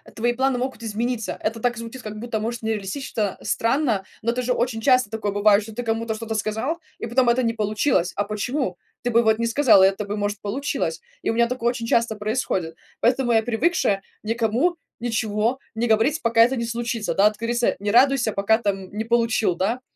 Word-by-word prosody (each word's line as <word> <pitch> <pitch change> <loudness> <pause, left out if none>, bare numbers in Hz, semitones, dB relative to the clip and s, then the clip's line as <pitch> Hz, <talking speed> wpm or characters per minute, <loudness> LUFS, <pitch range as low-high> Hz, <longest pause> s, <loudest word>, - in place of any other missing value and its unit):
твои 240 +2 +1
планы 260 0 +1
могут 255 -2 -4
измениться. 225 +1 -2
Это 225 +1 -2
так 245 +1 0
звучит, 230 +3 -8
как 215 0 -6
будто, 230 -1 -3
может, 230 +2 -3
нереалистично, 215 0 -3
странно, 230 -5 0 0.2
но 230 - -1
это 250 +1 -2
же 250 +1 +1
очень 240 -2 -1
часто 255 -3 +4
такое 215 -2 -2
бывает, 205 +1 +4
что 220 +1 -10
ты 245 - -4
кому-то 225 0 -1
что-то 220 0 -5
сказал, 220 +9 -1 0.2
и - - -4
потом 245 +1 +3
это 240 +2 +3
не 230 -1 +1
получилось. 210 -3 0
А 205 - 0
почему? 210 0 -2 0.2
Ты 245 - -1
бы, 235 0 +4
вот, 220 0 +3
не 230 - +1
сказал, 230 -6 +5
и - - +8
это 195 +2 -2
бы, 205 +1 -4
может, 205 0 -2
получилось. 275 - -2 0.2
И - - +1
у - - -2
меня 235 +1 +3
такое 240 -1 0
очень 235 -2 -4
часто 230 -1 +2
происходит. 210 -6 -2 0.2
Поэтому 245 0 +2
я 225 - +4
привыкшая 225 - +1 0.2
никому 230 +9 +1 0.2
ничего 225 +1 -1 0.2
не 235 +2 0
говорить, 225 +8 +2
пока 230 -1 +3
это 250 +3 +2
не 235 -2 -2
случится. 230 -1 -2
Да, 205 +2 +5
как 215 0 -13
говорится: 235 +1 0
"Не 205 +1 -1
радуйся, 245 -1 +4
пока 200 +3 +2
там 195 -3 -2
не 215 +1 -2
получил", 230 -4 +1
да? 220 +8 -1
230 Hz, 205 wpm, -23 LUFS, 215-245 Hz, 0.2 s, и